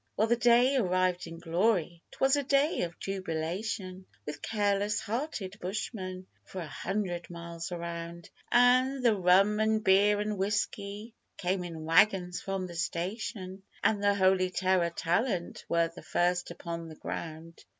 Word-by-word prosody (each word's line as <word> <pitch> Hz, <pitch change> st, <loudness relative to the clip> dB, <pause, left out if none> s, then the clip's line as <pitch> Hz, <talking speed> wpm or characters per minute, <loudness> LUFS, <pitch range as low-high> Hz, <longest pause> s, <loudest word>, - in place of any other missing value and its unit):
Well, 215 Hz, -, +4 dB
the 235 Hz, -, +3 dB
day 240 Hz, +3 st, +4 dB
arrived 185 Hz, -4 st, +1 dB
in 165 Hz, 0 st, -8 dB
glory; 175 Hz, 0 st, 0 dB
'twas 270 Hz, +1 st, +2 dB
a 290 Hz, -, +1 dB
day 280 Hz, +3 st, +2 dB
of 170 Hz, -1 st, -3 dB
jubilation 185 Hz, +1 st, -4 dB, 0.2 s
With 150 Hz, -1 st, -6 dB
careless 205 Hz, -1 st, 0 dB
hearted 220 Hz, -4 st, -4 dB
bushmen 185 Hz, -1 st, -4 dB, 0.2 s
for 190 Hz, -, -8 dB
a 170 Hz, -, -4 dB
hundred 180 Hz, 0 st, -3 dB
miles 170 Hz, 0 st, -7 dB
around, 170 Hz, 0 st, -6 dB, 0.2 s
An' 255 Hz, +2 st, +4 dB
the 230 Hz, -3 st, +5 dB
rum 195 Hz, +3 st, +4 dB
'n' 220 Hz, 0 st, +3 dB
beer 205 Hz, 0 st, +4 dB
'n' 210 Hz, 0 st, -2 dB
whisky 205 Hz, +2 st, -2 dB, 0.2 s
came 185 Hz, 0 st, -1 dB
in 165 Hz, -3 st, -7 dB
waggons 180 Hz, +1 st, +3 dB
from 195 Hz, -1 st, -3 dB
the 175 Hz, -, -8 dB
station, 185 Hz, +2 st, -4 dB, 0.2 s
An' 215 Hz, -, +3 dB
the 205 Hz, 0 st, +3 dB
Holy 185 Hz, -1 st, +3 dB
Terror 185 Hz, -2 st, +1 dB
talent 175 Hz, +2 st, -1 dB
were 170 Hz, 0 st, +2 dB
the -, -, -9 dB
first 180 Hz, +1 st, 0 dB
upon 170 Hz, -1 st, -6 dB
the 155 Hz, -, -10 dB
ground. 165 Hz, +1 st, -7 dB
190 Hz, 150 wpm, -30 LUFS, 175-210 Hz, 0.2 s, the